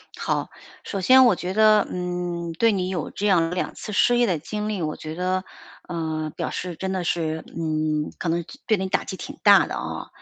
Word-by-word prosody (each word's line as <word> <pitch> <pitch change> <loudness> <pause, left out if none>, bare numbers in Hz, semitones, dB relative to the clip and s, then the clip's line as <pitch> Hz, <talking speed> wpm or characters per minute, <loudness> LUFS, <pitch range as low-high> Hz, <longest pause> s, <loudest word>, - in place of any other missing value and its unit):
好， - - -2 0.3
首 195 - -4
先 260 +7 +7
我 235 - +5
觉 180 +2 -4
得， 215 -1 +5
嗯， 175 -1 -3
对 225 +7 +3
你 185 -2 -1
有 185 -4 -3
这 205 - -4
样 170 -5 +3
2 180 - -2
次 - - -7
失 240 +4 +4
业 240 -1 +3
的 175 - +1
经 210 +7 -4
历， 205 -4 -2
我 155 - -2
觉 155 0 -7
得， 185 +1 -1 0.4
呃， 160 -3 -3
表 - - -3
示 180 -2 -4
真 190 +3 -3
的 185 -2 -1
是 160 -2 -1
嗯， 155 -2 -1
可 170 - -2
能 170 0 0 0.2
对 215 -4 +3
你 190 0 -2
打 - - 0
击 190 - -6
挺 290 +8 -8
大 - - +7
的 - - -6
啊， - - -5
180 Hz, 225 characters per minute, -24 LUFS, 165-205 Hz, 0.4 s, 先